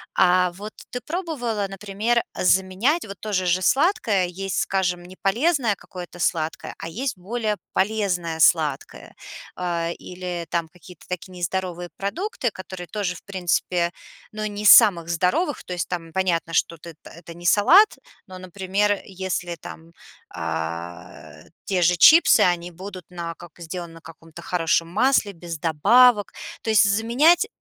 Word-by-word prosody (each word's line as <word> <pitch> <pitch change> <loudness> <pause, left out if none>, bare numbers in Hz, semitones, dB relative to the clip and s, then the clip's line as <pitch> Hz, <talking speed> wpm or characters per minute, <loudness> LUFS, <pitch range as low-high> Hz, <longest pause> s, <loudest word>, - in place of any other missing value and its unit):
А-а, 180 0 +4
вот 205 +4 -9 0.2
ты 250 - -2
пробовала, 275 - -3
например, 210 +4 -1
заменять 190 - +1
вот 200 -2 -9
то 215 -1 -6
же 185 -1 +1
же 180 +1 +1
сладкое? 235 - +2
Есть, 190 +2 -5
скажем, 180 -2 -1
не 180 +1 -13
полезное 240 - +1
какое-то 175 -2 -11
сладкое, 160 -2 -2
а 165 - -6
есть 245 +6 -4
более 215 +3 -2 0.2
полезное 185 -6 -1
сладкое. 155 -3 +1 0.4
А-а, 170 -2 -2
или 180 -1 -6
там 170 -1 -1
какие-то 180 0 -16
такие 180 +1 -6
нездоровые 180 0 -3
продукты, 295 - -2
которые 185 -2 -9
тоже 205 -4 -2
в - - -12
принципе, 180 -2 -1 0.4
ну, 215 0 -4
не 205 0 -6
из 210 - +8
самых 170 -5 0
здоровых. 185 - 0
То 180 - -5
есть 175 - -3
там 165 -2 -5
понятно, 170 -3 -1
что 170 - +1
ты 170 +2 -11
это 170 0 -12
не 175 0 -12
салат, 345 - +5 0.3
но, 185 -1 -10
например, 195 +2 -1 0.2
если 180 -2 -3
там, 165 0 -11 0.4
а-а, 85 +2 -6 0.2
те 185 -2 0
же 175 +1 +4
чипсы, 325 - +7
они 175 +1 -10
будут 185 0 -9
на 170 -2 -6
как 175 0 -13
сделаны 170 +1 -6
на 165 - -12
каком-то 165 0 -13
хорошем 165 -1 0
масле, 215 +1 +2
без 170 -2 -8
добавок, 165 +10 +3 0.6
то - - -5
есть 220 - +6
заменять 250 - +3
185 Hz, 150 wpm, -23 LUFS, 170-210 Hz, 0.6 s, из